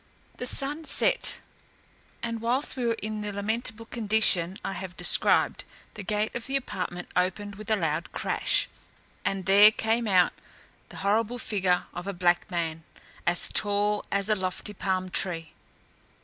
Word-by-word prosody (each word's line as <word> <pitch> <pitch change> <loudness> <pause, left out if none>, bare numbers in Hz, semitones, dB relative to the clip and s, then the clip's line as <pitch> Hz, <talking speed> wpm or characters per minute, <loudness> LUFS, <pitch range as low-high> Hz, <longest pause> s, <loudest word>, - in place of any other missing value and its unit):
The 250 - 0
sun 290 +5 +1
set, - - +2 0.8
and 230 -1 -3
whilst 250 +5 +1
we 250 -2 -1
were 230 - +1
in 215 0 -3
the 210 0 -3
lamentable 220 +2 -2
condition 210 -6 +1
I - - -2
have 190 -1 -7
described, - - +3 0.3
the 210 - -7
gate 210 +2 -1
of 235 - -4
the 270 - -2
apartment 180 -8 -4
opened 190 +3 0
with 210 +2 -10
a 220 - +4
loud 165 -3 -2
crash, - - +1 0.6
and 195 -1 -2
there 200 +2 +8
came 225 +1 0
out 185 -3 +4 0.6
the - - -11
horrible 225 +4 +1
figure 190 -6 0
of 175 +2 -6
a 200 - -2
black 175 -1 +1
man, 165 -3 -3 0.4
as 175 0 +3
tall 205 0 +1
as 200 0 +1
a 215 - +3
lofty 185 +2 -3
palm 185 -2 -2
tree. 165 -4 -2
205 Hz, 155 wpm, -27 LUFS, 185-220 Hz, 0.8 s, there